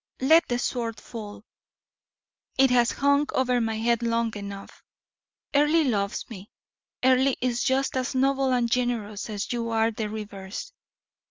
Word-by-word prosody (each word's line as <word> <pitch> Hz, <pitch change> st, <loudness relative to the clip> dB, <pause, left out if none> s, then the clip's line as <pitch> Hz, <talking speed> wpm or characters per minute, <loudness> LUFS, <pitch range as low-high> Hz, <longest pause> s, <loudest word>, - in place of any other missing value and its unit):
Let 320 Hz, +6 st, +5 dB
the 245 Hz, -, 0 dB
sword 230 Hz, -3 st, -2 dB
fall: 210 Hz, -1 st, -9 dB, 1.1 s
it 265 Hz, -1 st, +5 dB
has 240 Hz, -1 st, +4 dB
hung 280 Hz, +1 st, +2 dB
over 250 Hz, -2 st, +2 dB
my 225 Hz, -1 st, -1 dB
head 235 Hz, +1 st, +1 dB
long 230 Hz, -1 st, 0 dB
enough. 200 Hz, -1 st, -8 dB, 0.7 s
Earle 295 Hz, +3 st, +4 dB
loves 200 Hz, -5 st, -1 dB
me. 205 Hz, -3 st, -10 dB, 0.5 s
Earle 260 Hz, +1 st, +4 dB
is 245 Hz, -1 st, 0 dB
just 270 Hz, 0 st, +1 dB
as 260 Hz, 0 st, -2 dB
noble 270 Hz, 0 st, +2 dB
and 245 Hz, -2 st, +2 dB
generous 235 Hz, -4 st, -2 dB
as 210 Hz, +2 st, -3 dB
you 230 Hz, -1 st, -2 dB
are 225 Hz, 0 st, +2 dB
the 215 Hz, -1 st, -4 dB
reverse. 210 Hz, -, -7 dB
235 Hz, 145 wpm, -26 LUFS, 220-260 Hz, 1.1 s, Let